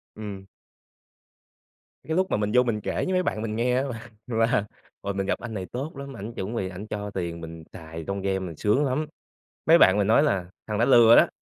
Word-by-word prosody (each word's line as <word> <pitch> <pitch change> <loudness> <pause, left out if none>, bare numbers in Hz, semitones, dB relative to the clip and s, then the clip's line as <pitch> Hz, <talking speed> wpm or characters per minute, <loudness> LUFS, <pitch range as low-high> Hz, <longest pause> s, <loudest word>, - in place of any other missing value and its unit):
Ừm. 100 -3 -7 1.6
Cái 160 - -2
lúc 190 0 +1
mà - - +2
mình 105 0 -1
vô 125 - +6
mình 110 -4 -1
kể - - -3
với 185 - -1
mấy 185 0 +2
bạn 110 - -2
mình 110 -1 -3
nghe 125 +2 +1
á 130 - +1
là 120 -4 -6 0.2
là 115 -3 +1 0.4
"Ôi, 100 0 -3
mình 95 0 -2
gặp - - -1
anh 120 -2 -7
này 95 -3 -4
tốt 135 - -6
lắm, 140 0 -7
ảnh 105 +4 -6
chuẩn 110 +1 -4
bị 95 -5 -2
ảnh 95 +3 -8
cho 105 -1 -4
tiền 85 -3 -4
mình 80 0 -8
xài 80 0 -8
trong 100 0 -2
game, 95 0 0
mình 90 -4 -6
sướng 105 - +2
lắm." 140 +4 0 0.6
Mấy 165 +1 +7
bạn 95 - +6
mình 100 -1 +2
nói 115 +7 +5
là 95 -12 +1 0.2
"Thằng 105 - -2
đó 115 - +3
lừa 120 -3 +7
đó, - - +7
110 Hz, 235 wpm, -26 LUFS, 95-125 Hz, 1.6 s, Mấy